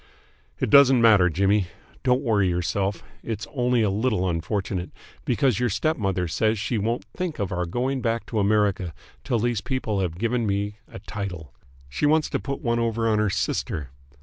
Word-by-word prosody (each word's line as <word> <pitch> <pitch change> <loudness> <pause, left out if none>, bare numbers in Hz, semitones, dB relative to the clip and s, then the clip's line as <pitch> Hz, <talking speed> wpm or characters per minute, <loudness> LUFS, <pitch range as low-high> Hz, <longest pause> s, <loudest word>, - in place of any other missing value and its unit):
"It - - -1
doesn't 135 -3 +7
matter, 105 -6 +6
Jimmy. 100 +3 +2 0.3
Don't 125 0 +2
worry 105 -6 +2
yourself. 90 +3 -1 0.2
It's 115 -1 -4
only 125 -3 +2
a 105 - +2
little 105 -3 0
unfortunate, 90 +2 -2 0.4
because 125 -3 +2
your 125 -1 +1
stepmother 100 - 0
says 110 +7 +1
she 110 +2 -1
won't 115 +4 -1
think 180 -3 -3
of 100 -4 -2
our 90 -1 -2
going 130 +8 -1
back 115 0 -1
to 110 - -2
America 100 -5 +1 0.3
till 125 -3 0
these 120 -1 0
people 125 -7 -2
here 95 - +1
have 80 - -12
given 115 +2 0
me 100 +1 -2
a - - -10
title. 90 - -6 0.3
She 70 - 0
wants 155 +1 +2
to - - 0
put 140 -1 -5
one 120 -1 +1
over 115 -1 0
on 110 -1 +2
her 105 -1 +2
sister. 75 -6 -2
105 Hz, 180 wpm, -24 LUFS, 95-120 Hz, 0.4 s, doesn't